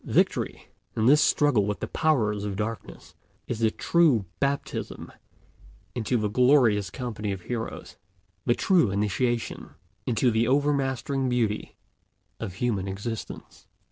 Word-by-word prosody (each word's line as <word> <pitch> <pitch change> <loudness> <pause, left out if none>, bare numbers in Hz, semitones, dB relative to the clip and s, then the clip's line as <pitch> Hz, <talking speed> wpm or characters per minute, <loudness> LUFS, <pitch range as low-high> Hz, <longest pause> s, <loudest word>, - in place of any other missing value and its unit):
Victory, - - 0 0.3
in 110 - +1
this 145 +5 +6
struggle 125 -9 +3
with 105 - -2
the - - -3
powers 110 -11 +1
of 100 -1 -3
darkness, 110 +2 -5 0.3
is 120 - -3
the 115 -1 +3
true 145 - +2
baptism 140 0 -3 0.8
into 120 +1 0
the 105 -2 0
glorious 120 -4 +4
company 110 -2 -4
of 95 -2 -5
heroes, 115 +4 -5 0.5
the 120 - +2
true 180 - +3
initiation 110 +4 -1 0.3
into 125 +1 +2
the 115 +1 +2
overmastering 135 -1 +1
beauty 115 -4 -1 0.6
of 95 - -5
human 105 -4 -1
existence. 100 +4 -6
115 Hz, 125 wpm, -26 LUFS, 105-135 Hz, 0.8 s, this